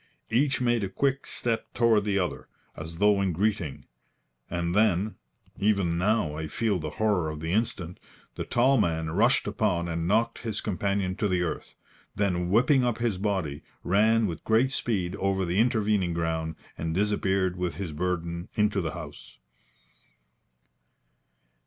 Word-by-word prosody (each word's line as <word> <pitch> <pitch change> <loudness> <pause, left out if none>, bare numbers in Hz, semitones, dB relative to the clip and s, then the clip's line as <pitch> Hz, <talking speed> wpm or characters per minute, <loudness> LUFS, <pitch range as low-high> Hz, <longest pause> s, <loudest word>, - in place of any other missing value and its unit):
Each 135 +4 +2
made 120 -3 +1
a 95 - -2
quick 135 +5 0
step 115 -2 -1
toward 115 -3 +3
the 100 -1 +1
other, 90 -3 -2 0.3
as 80 +1 -7
though 105 +1 +4
in 95 -3 0
greeting, 95 -5 -1 0.6
and 85 0 -2
then 105 0 +2 0.5
even 100 -5 +2
now 95 -4 +1
I 80 +1 -4
feel 100 +4 0
the 80 -1 -4
horror 100 -7 +1
of 75 0 -6
the 80 +1 -3
instant 90 -5 -1 0.3
the - - -4
tall 130 +2 +3
man 80 -4 0
rushed - - +3
upon 85 -1 0
and 85 0 -2
knocked 115 +4 +1
his 110 -3 -3
companion 100 -2 -1
to 105 - +1
the 90 -2 +1
earth, 85 - -5 0.4
then 90 -3 0
whipping 125 +6 +4
up 120 -2 0
his 115 -6 -1
body, 95 -8 -1 0.2
ran 110 +4 +3
with 85 -6 -4
great 115 +4 +3
speed 95 -9 -1
over 95 -1 0
the 90 +3 0
intervening 105 -6 +2
ground 80 -1 -2 0.2
and 80 0 -2
disappeared 95 -2 +1
with 90 -4 -2
his 90 -2 -4
burden 85 +2 -3
into 105 -2 +2
the 80 -2 -3
house. 80 -5 -10
95 Hz, 155 wpm, -27 LUFS, 85-110 Hz, 0.6 s, though